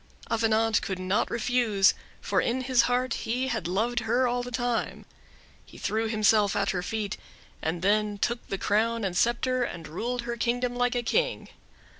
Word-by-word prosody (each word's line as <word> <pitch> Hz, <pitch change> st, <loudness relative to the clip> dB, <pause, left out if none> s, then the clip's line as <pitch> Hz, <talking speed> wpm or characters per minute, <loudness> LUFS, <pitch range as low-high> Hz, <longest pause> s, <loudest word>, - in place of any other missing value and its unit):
Avenant 225 Hz, -1 st, +2 dB
could 190 Hz, -, -3 dB
not 185 Hz, +2 st, 0 dB
refuse: 230 Hz, -4 st, +2 dB, 0.3 s
for -, -, +1 dB
in 250 Hz, +2 st, -1 dB
his 255 Hz, -1 st, +3 dB
heart 250 Hz, 0 st, +1 dB
he 250 Hz, +3 st, -2 dB
had 225 Hz, -7 st, -2 dB
loved 225 Hz, +7 st, 0 dB
her 240 Hz, +2 st, +1 dB
all 245 Hz, 0 st, 0 dB
the 245 Hz, -, -6 dB
time. 245 Hz, -1 st, -2 dB, 0.6 s
He -, -, -15 dB
threw 220 Hz, +2 st, -1 dB
himself 215 Hz, -2 st, +3 dB
at 200 Hz, -1 st, +1 dB
her 180 Hz, -, -2 dB
feet, 210 Hz, +2 st, -3 dB, 0.4 s
and 165 Hz, +2 st, -2 dB
then 210 Hz, +1 st, +2 dB
took 235 Hz, +3 st, -2 dB
the 195 Hz, -, -3 dB
crown 225 Hz, +4 st, +1 dB
and 190 Hz, -3 st, -2 dB
scepter, 245 Hz, +5 st, +1 dB
and 170 Hz, -9 st, -4 dB
ruled 235 Hz, +10 st, -3 dB
her 235 Hz, 0 st, -4 dB
kingdom 245 Hz, +1 st, 0 dB
like 245 Hz, 0 st, +1 dB
a 240 Hz, -, 0 dB
king. -, -, 0 dB
230 Hz, 175 wpm, -27 LUFS, 205-245 Hz, 0.6 s, his